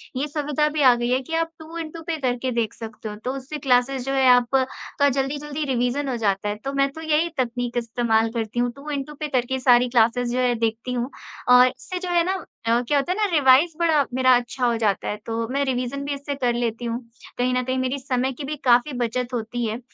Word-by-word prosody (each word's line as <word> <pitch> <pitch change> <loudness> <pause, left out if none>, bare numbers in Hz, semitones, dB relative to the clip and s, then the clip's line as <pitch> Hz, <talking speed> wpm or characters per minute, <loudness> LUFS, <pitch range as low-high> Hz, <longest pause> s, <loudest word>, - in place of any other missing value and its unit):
ये 275 +3 -1
सुविधा 300 0 0
भी 300 -1 -2
आ 255 -2 +8
गई 240 0 -2
है 255 +1 +2
कि 325 - -8
आप 330 0 0
टू 320 +1 -9
इन 325 -2 -4
टू 330 - -9
पे 325 -1 -1
करके 255 0 -1
देख 230 -3 -1
सकते 220 -1 -8
हो 210 - -6
तो 255 - -1
उससे 275 +3 -6
क्लासेस 255 0 +1
जो 270 - -1
है 265 -1 +3
आपका 260 +3 +2
जल्दी-जल्दी 285 +3 -2
रिविजन 265 +2 0
हो 255 - -1
जाता 205 -1 0
है। 205 - -2
तो 275 - -2
मैं 275 0 +2
तो 320 - -8
यही 315 +1 +1
तकनीक 245 -1 -2
इस्तेमाल 230 -1 +1
करती 230 0 -3
हूँ 245 0 +1
टू 280 +2 -9
इन 280 -1 -2
टू 300 - -11
पे 305 - -2
करके 260 +2 -1
सारी 245 -1 +4
क्लासेस 240 0 +2
जो 250 - -1
है 250 -1 +2
देखती 230 +2 -2
हूँ। 245 +2 -2 0.4
और 250 0 +8
इससे 365 +8 -5
जो 360 -1 -5
है 345 -1 +3
ना 375 -1 -2 0.2
अ, 235 +1 +3
क्या 290 - +2
होता 280 +6 0
है 375 - -1
ना 430 - +2
रिवाइज़ 280 +4 +5
बड़ा 315 -5 +3
मेरा 255 0 +5
अच्छा 245 +1 -3
हो 235 -1 +2
जाता 210 -4 0
है - - -1
तो 230 0 -2
मैं 280 +1 +1
रिविजन 260 +2 -2
इससे 280 0 -4
कर 250 -3 0
लेती 235 0 -2
हूँ। 235 +1 -2 0.4
कहीं 250 +1 +1
न 250 0 +1
कहीं 260 +1 -2
मेरी 260 +2 -1
समय 260 0 -1
की 280 - -8
भी 300 +2 -3
काफ़ी 245 +3 +4
बचत 245 +1 -2
होती 235 +1 -2
है। 225 +2 -3
255 Hz, 245 wpm, -23 LUFS, 240-280 Hz, 0.4 s, आ